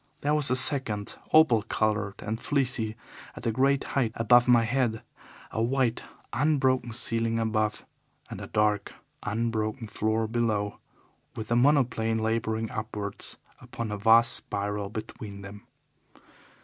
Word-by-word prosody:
There 145 +1 0
was 150 -2 +5
a 125 - +2
second 130 -6 +5 0.2
opal 155 -8 +5
coloured 105 -2 -2
and 110 +2 -4
fleecy 125 -6 -1 0.4
at - - -10
a 115 - +1
great 135 +4 +1
height 120 -5 -1
above 120 +2 +4
my 120 -2 +5
head, 120 -1 -1 0.5
a 110 - -2
white, 120 0 0 0.3
unbroken 130 -3 +1
ceiling 115 0 -1
above, 110 -1 -1 0.4
and - - -8
a - - -7
dark, 105 -1 0 0.3
unbroken 110 0 -3
floor 110 +1 -1
below, 110 -3 -2 0.6
with 110 - -7
the 120 - +1
monoplane 120 -4 +2
labouring 110 0 -2
upwards 105 -2 -6 0.2
upon 115 -2 -6
a 105 - -3
vast 115 +3 +5
spiral 100 0 -3
between 105 -2 -8
them. 100 0 -11
115 Hz, 135 wpm, -27 LUFS, 110-125 Hz, 0.6 s, was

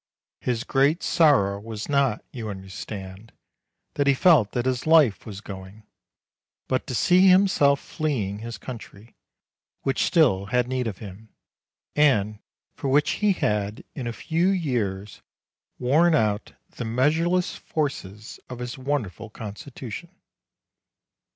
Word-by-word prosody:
His 120 -1 -2
great 140 +6 +2
sorrow 115 - +3
was 110 0 -6
not, 140 -6 +1
you 115 -4 -5
understand, 95 +1 -8 0.6
that 145 -1 0
he 140 - +5
felt 135 - +4
that 120 0 -1
his 130 +2 -1
life 155 -12 +4
was 100 -2 -7
going, 95 +1 -10 0.8
but 130 +2 -1
to 130 - -3
see 180 +9 +5
himself 185 -7 +5
fleeing 115 - -3
his 115 +1 -6
country, 115 -3 -10 0.7
which 135 -1 0
still 120 - +3
had 125 +2 +1
need 130 -1 -1
of 100 -4 -4
him, 105 +1 -11 0.7
and 110 -8 +3 0.3
for - - -5
which 145 +2 +3
he 210 -1 +4
had, 105 - -1
in 125 - -5
a - - -2
few 165 +9 0
years, 110 - -2 0.6
worn 155 +7 +3
out 105 -5 0
the - - -7
measureless 160 +10 +1
forces 110 -9 -4
of 125 - -6
his 125 +1 -6
won 140 0 0
derful 110 +4 -10
constitution. 115 +7 -8
125 Hz, 130 wpm, -25 LUFS, 105-145 Hz, 0.8 s, he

